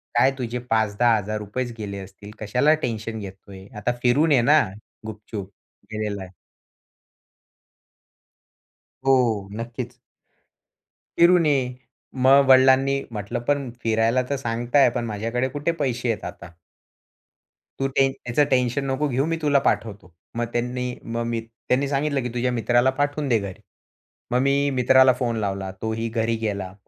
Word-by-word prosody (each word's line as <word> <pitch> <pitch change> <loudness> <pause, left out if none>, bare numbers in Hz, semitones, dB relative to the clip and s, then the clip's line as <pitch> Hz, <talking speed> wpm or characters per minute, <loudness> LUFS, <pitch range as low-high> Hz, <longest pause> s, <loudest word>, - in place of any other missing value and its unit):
काय 130 +3 +5
तुझे 125 -1 -3
₹5000-10000 110 0 0
चं 120 - -8
गेले 100 -2 -5
असतील. 100 +2 -11
कशाला 125 +8 +2
टेन्शन 110 -1 -3
घेतोय? 95 -1 -10
आता 105 +4 0
फिरून 145 +6 +3
ये 130 - +5
ना 150 +6 +5 0.5
गुपचुप." 105 -2 -7 0.4
गेलेलाय. 100 -3 -4 2.7
हो 120 -7 +2
नक्कीच. 115 0 -6 1.2
फिरून 175 0 +5
ये. 135 -4 +1 0.4
मग 135 +2 +5
वडिलांनी 135 +1 +5
म्हंटलं, 110 +3 -4
"पण 140 +2 -1
फिरायला 115 +2 +2
तर 140 - 0
सांगताय 120 +2 +2
पण 120 - -1
माझ्याकडे 115 +4 -2
कुठे 145 +4 -1
पैसे 125 -7 -2
आहेत 105 - -5
आता." 85 0 -9 1.3
"तू 135 - +1
ते, 135 0 +2
टेन 135 - -3
त्याचं 125 +4 +2
टेन्शन 125 +1 +1
नको 140 +3 0
घेऊ 135 +1 0
मी 165 +1 -1
तुला 145 -2 +3
पाठवतो." 100 -5 -4 0.2
मग 120 - 0
त्यांनी, 125 +1 -2
मग 115 +1 -3
मी 115 -1 -2
त्यांनी 125 +4 -2
सांगितलं, 140 0 0
"की 125 - -3
तुझ्या 125 +1 0
मित्राला 120 +1 +2
पाठवून 145 0 0
दे 115 -3 +3
घरी." 100 -2 -7 0.7
मग 125 - +2
मी 140 +1 +2
मित्राला 130 +1 +6
फोन 120 -2 -2
लावला. 95 -2 -3
तोही 110 +1 -2
घरी 115 0 0
गेला. 100 -3 -3
120 Hz, 140 wpm, -23 LUFS, 110-135 Hz, 2.7 s, मित्राला